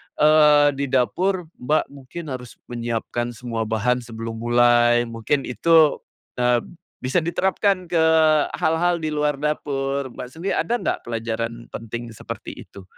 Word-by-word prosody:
eee, 150 -1 +5
di 140 - 0
dapur 180 +9 +1 0.2
Mbak 150 +5 0
mungkin 140 +3 -9
harus 125 -2 -7 0.2
menyiapkan 120 0 -3
semua 115 -2 -4
bahan 120 +3 +1
sebelum 115 -1 -7
mulai. 120 0 +4
Mungkin 115 +5 -2
itu, 155 +6 +3 0.4
eee, 125 -1 +2 0.4
bisa 145 +6 0
diterapkan 185 +2 0
ke 165 -1 +2 0.6
hal-hal 170 +1 +1
di 155 - -3
luar 150 -2 0
dapur. 140 -2 -2
Mbak 125 +4 -9
sendiri 175 +4 -3
ada 235 - 0
nggak 240 - -3
pelajaran 115 0 -3
penting 115 +1 -6
seperti 110 - -8
itu? 100 - -12
130 Hz, 135 wpm, -22 LUFS, 120-155 Hz, 0.6 s, eee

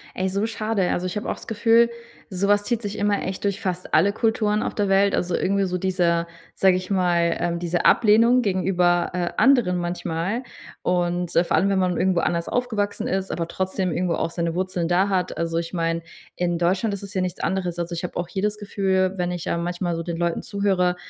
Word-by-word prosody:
Ey, 185 +1 -1
so 200 +3 -1
schade. 215 -3 -1
Also, 180 +1 -1
ich 180 - -4
habe 210 - -4
auch - - 0
das - - -14
Gefühl, 230 +1 +4 0.4
so 195 0 -1
was 205 0 +3
zieht 235 +1 -1
sich 205 0 -4
immer 205 0 +1
echt 190 +2 -5
durch 200 +1 -1
fast 180 -2 -4
alle 190 +6 +4
Kulturen 215 -1 +1
auf - - -3
der 205 -2 +1
Welt. 195 +1 +3
Also 180 -1 -1
irgendwie 195 +1 +1
so 180 -1 -2
dieser 175 -2 +1 0.3
sag 190 -1 +4
ich 185 0 -3
mal 180 -3 +2 0.2
äh, 170 0 -1
diese 175 0 -2
Ablehnung 230 +3 +5
gegenüber, 180 -3 +1
äh, 175 -1 -1
anderen 245 -10 +4
manchmal. 175 +5 -2 0.4
Und, 175 -1 0
äh, 170 - +5
vor - - +1
allem, 195 - +2
wenn 195 -1 +2
man 180 -2 +1
irgendwo 185 -2 +2
anders 170 -1 -1
aufgewachsen 220 -5 -1
ist, 190 0 -2
aber 170 -1 -2
trotzdem 190 0 -2
irgendwo 175 +1 0
auch 165 - -1
seine 170 -1 -2
Wurzeln 180 -2 -1
da 185 +3 +2
hat. 185 -2 -1
Also, 165 0 -1
ich 165 +1 -3
mein, 165 -1 -1 0.3
in 175 -1 0
Deutschland 185 +5 +1
ist 200 - -6
es 200 0 -8
ja 185 - +1
nichts 180 -1 -3
anderes. 180 -2 -2
Also, 170 0 -3
ich 170 - -4
habe 180 - -5
auch 175 - -2
hier 190 +3 -4
das 210 0 0
Gefühl, 190 -2 0
wenn 180 0 -1
ich, 175 -2 -5
äh, - - 0
manchmal 175 0 -2
so 165 - -3
den 170 -1 -4
Leuten 170 0 -1
zuhöre, 190 -3 +1
185 Hz, 225 wpm, -23 LUFS, 175-200 Hz, 0.4 s, Ablehnung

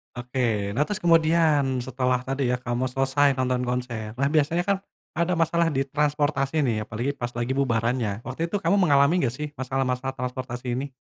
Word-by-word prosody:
Oke! 120 -5 -1
Nah, 150 - +3
terus 210 0 -4
kemudian 160 -6 +3
setelah 125 0 0
tadi 135 +1 -2
ya 125 0 0
kamu 120 +1 -1
selesai 135 +2 +2
nonton 125 -1 0
konser. 120 -3 -3
Nah, 140 +3 0
biasanya 160 +3 +2
kan 200 +2 +1 0.4
ada 170 +1 +1
masalah 165 -1 +1
di 135 - +1
transportasi 145 0 +1
nih 110 -6 0
apalagi 125 +7 -3
pas 120 0 -4
lagi 120 +2 -2
bubarannya, 115 -4 0
waktu 130 +7 -3
itu 205 - 0
kamu 170 +5 +2
mengalami 145 -4 +4
enggak 125 -9 0
sih, 150 +4 -4
masalah-masalah 130 0 -2
transportasi 125 -1 -4
ini? 135 0 -5
130 Hz, 175 wpm, -25 LUFS, 125-150 Hz, 0.4 s, mengalami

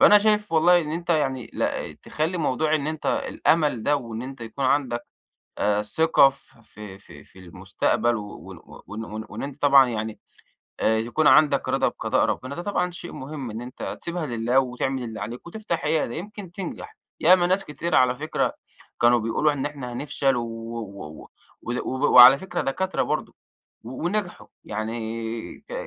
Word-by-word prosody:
فأنا 210 -6 +8
شايف 210 -2 +1
والله 175 +2 +5
إن 155 -2 -5
أنت 170 +1 -3
يعني 135 -6 0
لأ - - -2
تخلي 160 +4 -3
موضوع 155 +1 +1
إن 145 -1 -1
أنت 155 0 -4
الأمل 150 -8 +1
ده 145 +5 +2
وإن 115 -3 -6
أنت 135 0 -8
يكون 115 +4 -5
عندك 130 -3 +1 0.8
ثقة 160 +4 +4
في 105 -7 -13
في - - -15
في - - -19
المستقبل 95 +6 -1
و 105 -1 -9 0.2
وإن 110 0 -6
وإن 105 - -7
أنت 140 +1 -7
طبعًا 140 -2 +7
يعني 110 -2 -4 0.6
آآ، 110 0 +2
يكون 120 +7 +1
عندك 145 -3 +5
رضا - - +2
بقضاء - - 0
ربنا، 130 +2 -3
ده 175 - -5
طبعًا 180 -2 -1
شيء 175 0 -8
مهم 135 -3 -6
إن 110 +2 -6
أنت 125 +1 -6
تسيبها 170 -1 -3
لله 120 0 +1
وتعمل 130 0 -2
اللي 115 -2 -6
عليك 120 +9 -7
وتفتح 170 -5 -4
عيادة 150 -6 0
يمكن 200 +1 -8
تنجح، 180 -1 -7 0.2
ياما 175 +1 +5
ناس 190 +2 +1
كتير 165 +3 -2
على 125 -1 +4
فكرة 155 +4 -1 0.5
كانوا 120 +1 +5
بيقولوا 115 +7 +1
إن 140 -1 -3
احنا 140 -4 -6
هنفشل 135 0 0
و 120 - -1
و 115 -8 -8 0.5
و - - -4 0.2
وعلى 125 +2 +10
فكرة 190 +3 -4
دكاترة 185 +8 -1
برضه 150 - -3 0.5
و 115 - -9 0.2
ونجحوا، 190 0 -2 0.2
يعني 115 +1 -5
ك - - -7
135 Hz, 160 wpm, -24 LUFS, 115-160 Hz, 0.8 s, وعلى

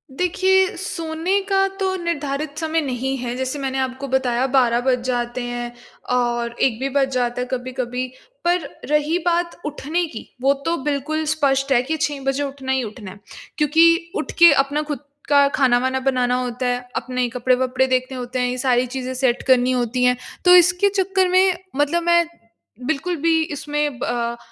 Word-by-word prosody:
देखिए, 375 +2 +3
सोने 335 +1 -2
का 390 0 +3
तो 380 -1 0
निर्धारित 295 -2 -3
समय 320 0 0
नहीं 265 -1 -2
है 245 -1 -4
जैसे 260 +2 -3
मैंने 265 -1 -2
आपको 260 +1 -3
बताया 255 -1 +1
12 245 -3 +3
बज 250 -1 +1
जाते 245 0 -2
हैं 240 0 -5 0.4
और 240 -1 -1
1 235 -3 +1
भी 270 +1 -1
बज 270 -1 +1
जाता 245 0 -1
है 250 - -3
कभी-कभी। 255 0 -3 0.4
पर 345 -4 +1 0.2
रही 300 +3 +2
बात 345 0 0
उठने 305 +4 -2
की 230 - -9 0.2
वो 275 +1 +4
तो 335 +1 0
बिल्कुल 300 +2 -1
स्पष्ट 275 -2 +1
है 245 -2 +5
कि 315 +4 -2
6 290 -2 -2
बजे 270 +1 0
उठना 270 -1 -4
ही 260 -1 +1
उठना 210 -3 -8
है 200 - -14 0.4
क्योंकि 335 +3 +4
उठ - - -3
के 340 0 +9
अपना 290 +2 -2
खुद 290 - -3 0.3
का 285 -1 +5
खाना-वाना 260 0 +2
बनाना 250 -2 +1
होता 250 +1 -3
है। 245 0 -2
अपने 255 -1 -1
कपड़े-वपड़े 255 +2 +1
देखने 255 0 -1
होते 250 +1 -4
हैं। 250 - +1
ये 250 - -3
सारी 250 -1 +2
चीजें 260 0 -3
सेट 255 -1 +1
करनी 255 0 +4
होती 250 0 0
हैं। 250 0 +3 0.3
तो 360 0 +8
इसके 360 +3 +5
चक्कर 385 -1 +1
में 370 +1 +4 0.2
मतलब 295 +5 +1
मैं 340 -1 +3 0.6
बिल्कुल 315 +5 -1
भी 325 -1 +3
इसमें 295 -2 -3
ब 235 -1 -2
270 Hz, 175 wpm, -21 LUFS, 250-315 Hz, 0.6 s, के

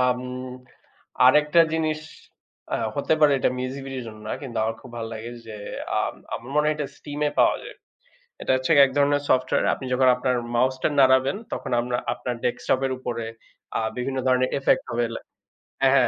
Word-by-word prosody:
আম 125 0 +2 1.1
আরেকটা 150 +5 +5
জিনিস 155 -1 0 0.7
আ - - +2 0.2
হতে 140 +3 +1
পারে 150 -1 +6
এটা - - +2
মিউজিক 130 +2 -4
ভিডিওর 130 -3 -5
জন্য 110 -1 -11
না। - - -2
কিন্তু 120 -4 -7
আমার 110 +1 0
খুব 130 - -13
ভাল 115 - -3
লাগে, 115 +2 -6 0.2
যে 110 - -8 0.4
আম - - -1 0.2
আমার 125 +3 -7
মনে 150 0 +3
হয় 155 - +2
এটা 150 -2 -2
Steam 145 0 -7
-এ 145 - +1
পাওয়া - - +4
যায়। - - -10 0.7
এটা - - +1
হচ্ছে 130 +5 +1
এক - - -6
ধরনের 145 0 +3
সফটওয়্যার। 130 0 +2
আপনি 130 - -8
যখন 130 0 +4
আপনার 125 0 0 0.2
মাউসটা 130 +3 +2
নাড়াবেন 130 +4 +4 0.2
তখন - - -4
আমরা 120 0 -1 0.2
আপনার 125 0 -4
ডেস্কটপের 130 +2 0
উপরে 120 -3 -4 0.5
আ - - 0 0.2
বিভিন্ন 130 +2 -2
ধরনের 130 0 +3
ইফেক্ট 135 - +2
হবে 120 0 0
লা - - -5 0.6
হ্যাঁ, - - +5
130 Hz, 180 wpm, -24 LUFS, 125-145 Hz, 1.1 s, পারে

